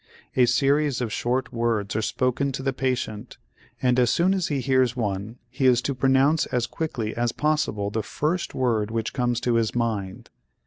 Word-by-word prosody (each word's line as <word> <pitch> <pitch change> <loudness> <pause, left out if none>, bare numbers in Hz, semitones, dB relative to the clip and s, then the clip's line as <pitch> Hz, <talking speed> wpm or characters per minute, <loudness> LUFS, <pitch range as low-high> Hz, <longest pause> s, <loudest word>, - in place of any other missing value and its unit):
A 125 -1 +5
series 140 +2 +2
of 120 -4 -3
short 125 +2 -1
words 115 -4 -1
are 110 - +1
spoken 130 +5 0
to 130 - -4
the 135 0 0
patient 125 -4 -3 0.5
and, 125 0 +3
as 120 -2 +4
soon 180 +7 +3
as 190 -3 0
he 145 -2 -1
hears 130 -1 +2
one, 105 0 -3
he 130 +2 0
is 125 -2 +5
to 140 - -1
pronounce 135 +4 +3
as 120 -2 0
quickly 120 -6 -4
as 120 0 0
possible 135 -10 0
the 110 - -1
first 155 - -2
word 115 -5 +1
which 115 0 -3
comes 120 -2 0
to 120 - +1
his 115 0 0
mind. 110 -5 -3
125 Hz, 185 wpm, -24 LUFS, 115-135 Hz, 0.5 s, A